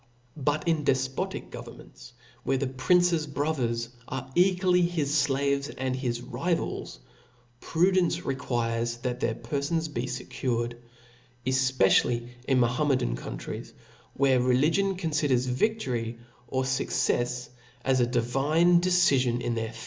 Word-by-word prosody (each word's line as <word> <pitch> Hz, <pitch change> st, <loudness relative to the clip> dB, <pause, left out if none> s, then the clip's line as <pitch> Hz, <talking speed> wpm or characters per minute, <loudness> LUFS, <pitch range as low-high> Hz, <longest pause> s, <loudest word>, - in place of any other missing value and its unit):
But 145 Hz, +3 st, -1 dB
in 160 Hz, -3 st, +2 dB
defpotic 130 Hz, -1 st, -1 dB
governments, 125 Hz, -, -11 dB, 0.3 s
where 135 Hz, -, +1 dB
the 135 Hz, -, -1 dB
prince's 165 Hz, +5 st, +2 dB
brothers 130 Hz, -5 st, -1 dB, 0.2 s
are 130 Hz, 0 st, -5 dB
equally 180 Hz, +1 st, +3 dB
his 165 Hz, -5 st, 0 dB
flaves 140 Hz, 0 st, 0 dB
and 130 Hz, 0 st, -1 dB
his 120 Hz, -2 st, -3 dB
rivals, 165 Hz, -, -2 dB, 0.6 s
pru,, 180 Hz, +4 st, +2 dB
dence 175 Hz, -2 st, +1 dB
requires 120 Hz, -3 st, -1 dB
chat 125 Hz, +1 st, -3 dB
their 115 Hz, -2 st, 0 dB
perfons 155 Hz, +4 st, -2 dB
be 120 Hz, 0 st, -2 dB
fccured; 125 Hz, -1 st, -2 dB, 0.7 s
efpe 130 Hz, 0 st, +1 dB
^ 95 Hz, -, +6 dB
daily 120 Hz, 0 st, -3 dB, 0.2 s
in 130 Hz, -2 st, +3 dB
Mahometan 125 Hz, -, +1 dB
countries, -, -, -7 dB, 0.4 s
where 130 Hz, -2 st, +3 dB
religion 160 Hz, +10 st, +2 dB
confi. 155 Hz, -4 st, 0 dB
dcrs 125 Hz, -1 st, +2 dB
victory 125 Hz, -, -1 dB, 0.3 s
or 130 Hz, +2 st, -1 dB
fuccefs 125 Hz, -1 st, 0 dB, 0.4 s
as 130 Hz, -1 st, +3 dB
a 120 Hz, -, +3 dB
divine 140 Hz, +9 st, +3 dB
decifion 140 Hz, -10 st, +3 dB
in 120 Hz, 0 st, -2 dB
their 115 Hz, -1 st, -3 dB
130 Hz, 125 wpm, -27 LUFS, 125-155 Hz, 0.7 s, ^